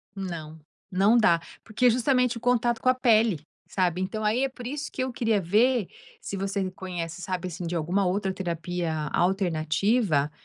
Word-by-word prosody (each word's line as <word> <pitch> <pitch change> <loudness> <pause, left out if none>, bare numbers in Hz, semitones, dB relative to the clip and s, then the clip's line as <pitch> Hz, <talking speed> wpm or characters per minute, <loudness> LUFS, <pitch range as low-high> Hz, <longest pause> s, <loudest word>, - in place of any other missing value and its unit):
Não. 165 -5 -6 0.3
Não 200 +5 +4
dá 175 -7 +4 0.2
porque 230 +3 -1
é - - +8
justamente 250 0 +2
o - - -6
contato 240 -1 +1
com 255 - +3
a 255 - +4
pele, 225 -7 +3 0.3
sabe, 180 -1 0
então, 215 +3 -3
aí 220 +5 +2
é - - -2
por 250 -2 -11
isso 285 +4 -4
que 260 - -2
eu 260 -1 -3
queria 225 -3 +1
ver 215 +4 +2 0.3
se - - -6
você 195 0 -2
conhece 180 -2 -6
sabe 185 0 -3
assim, 175 0 -5
de 175 - -3
alguma 180 +4 +1
outra 190 +1 -1
terapia 175 -2 -3 0.2
alternativa 175 - +1
195 Hz, 180 wpm, -26 LUFS, 175-235 Hz, 0.3 s, é